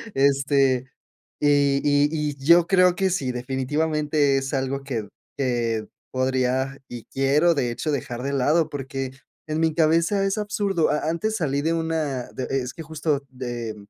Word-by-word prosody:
Este, 135 -2 +3 0.6
y 140 -1 +3
y 145 0 +3
y 150 -2 -2
yo 170 +3 +6
creo 180 -2 +4
que 190 +1 +1
sí, 135 -9 -1
definitivamente 145 +3 0
es 135 +1 -3
algo 135 0 -1
que 115 -7 -4 0.3
que 120 -4 -1 0.2
podría, 130 +1 0
y 120 -2 -7
quiero 145 +6 +3
de 125 -4 0
hecho 150 +6 -3
dejar 125 -3 -3
de 140 +1 -2
lado, 150 +5 +2
porque 135 -1 -4 0.4
en 155 0 -2
mi 160 -1 +2
cabeza 165 +5 +2
es 195 +2 0
absurdo. 205 -5 0
A 150 - -1
antes 215 +7 -1
salí 140 -4 0
de 165 +2 +1
una 160 -6 -2
de 130 - -4
es 130 -2 -2
que 165 - -9
justo, 155 -2 -2
de 120 -4 -5
140 Hz, 160 wpm, -24 LUFS, 130-160 Hz, 0.6 s, yo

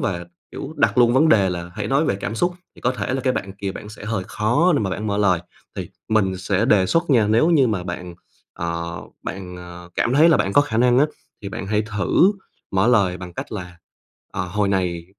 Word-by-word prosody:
và, 85 -2 -2 0.3
kiểu, 155 +3 -7
đặt 110 +1 +2
luôn 120 -1 +6
vấn 155 +5 +5
đề 100 -9 +4
là 85 0 -5
hãy 105 -1 -3
nói 135 +6 +2
về 95 - 0
cảm 105 +2 -4
xúc, 175 +8 0 0.2
thì - - -16
có 125 - +1
thể 115 +1 -3
là 135 - -1
cái 130 0 +1
bạn 95 -1 -4
kia 100 -1 -5
bạn 105 - -9
sẽ 105 -1 -10
hơi 105 -4 -2
khó 120 - +2
để - - +2
mà 100 -3 -1
bạn 100 +4 -3
mở 100 0 -1
lời. 90 -4 +3 0.4
Thì - - -5 0.2
mình 95 -4 +2
sẽ 95 +3 0
đề 100 -5 +4
xuất 165 - +1
nha, 115 -5 +4
nếu 115 +10 +4
như 145 -6 +5
mà 100 -5 -1
bạn, 90 0 -6 0.4
ờ, 85 -1 -4 0.2
bạn, 90 -1 -6
ờ, 90 0 -10
cảm 120 - +1
thấy 155 +4 +6
là 165 - +5
bạn 95 - 0
có 145 - +6
khả 145 -6 -2
năng 125 +1 +4
á, 150 - +5 0.4
thì 100 - -4
bạn 100 -1 -6
hãy 105 +1 +1
thử 105 - +2 0.4
mở 95 +3 +2
lời 100 -7 +3
bằng 90 -2 -9
cách - - -7
là, 90 -4 -7 0.5
ờ, 90 - -2
hồi 100 +2 -1
này 90 -3 -1
105 Hz, 240 wpm, -22 LUFS, 90-120 Hz, 0.5 s, luôn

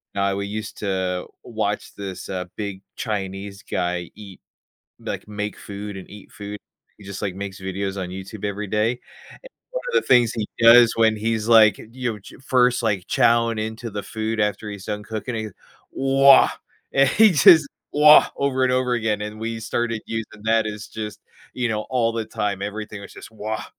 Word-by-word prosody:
now 100 0 +1
we 100 0 -3
used 105 +1 -6
to 95 -3 -2 0.2
watch - - -3
this, 95 -2 -7
uh, 90 -1 -3
big 100 -2 -5 0.2
Chinese 100 -2 -4
guy 90 -1 -3
eat 100 -3 -12 0.6
like, - - -6
make 105 0 -4
food 100 0 -7
and 95 - -10
eat 105 0 -13
food. 105 0 -7 0.4
He 100 - -15
just, 100 +1 -7
like, 100 -3 -2
makes 100 0 -6
videos 95 +1 -3
on 90 - -4
YouTube 95 +3 -8
every 105 +1 -3
day, 105 +2 +1
and 125 - -7 0.7
one - - -4
of 480 - -4
the 470 - +2
things 120 -2 +5
he 110 -3 -2 0.2
does 115 0 +8
when 110 -1 +3
he's, 110 0 -1
like, 110 -2 +6
you 120 -3 -4
ch - - -14
first, 125 -2 +3
like, 100 -5 -1
chowing 115 -1 +2
into 110 +2 -4
the 105 0 -5
food 110 0 -4
after 105 0 -1
he's 100 -2 -8
done 105 -1 -4
cooking, 110 +3 -5
he, 110 -1 -3 0.4
"Wah," 135 0 +5 0.4
and 135 -1 +4
he 220 -1 +6
just 160 -2 +7 0.2
wah 150 +1 +7
over 130 -2 +1
and 125 - +2
over 125 -1 +1
again, 110 -3 0
and 105 +1 -6
we 115 0 -4
started 115 0 -2
using 110 -1 -6
that 110 0 +2
as 105 0 -6
just, 110 -1 -6 0.4
you 125 -1 -1
know, 110 -1 -1
all 120 -3 +1
the 115 -1 -3
time. 100 -2 -2
Everything 105 0 -5
was 100 - -11
just - - -11
wah. 110 +1 -5
110 Hz, 185 wpm, -22 LUFS, 100-115 Hz, 0.7 s, does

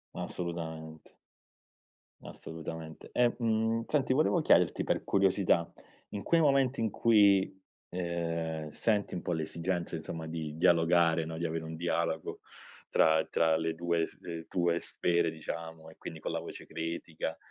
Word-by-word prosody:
Assolutamente. 80 -2 -6 1.0
Assolutamente. 80 0 -8
E, 120 -1 +4
mmh, 115 -1 +1
senti 135 -3 +2
volevo 155 +5 +3
chiederti, 90 - +4
per - - 0
curiosità, 95 -3 +2 0.4
in 100 -1 -5
quei 170 -1 +3
momenti 135 -4 +3
in 110 - +1
cui, 100 -4 +4 0.3
ehm, 85 -3 -2
senti 105 +5 0
un 90 - -3
po' 90 - -2
l'esigenza 85 +2 -2
insomma 80 0 -5
di 80 -2 -4
dialogare 85 -1 +4
no, 80 0 -5
di 85 - -2
avere 80 0 -2
un 80 0 -6
dialogo 85 -1 -1 0.5
tra 80 0 +4
tra 80 -1 +3
le 80 0 -1
due 85 0 +1
sf 85 -1 -8
tue 85 -1 +1
sfere 85 0 +1
diciamo 80 0 -7
e 80 - -15
quindi 80 - -8
con - - -4
la - - -1
voce - - -8
critica, 80 0 -4
85 Hz, 140 wpm, -31 LUFS, 80-95 Hz, 1.0 s, E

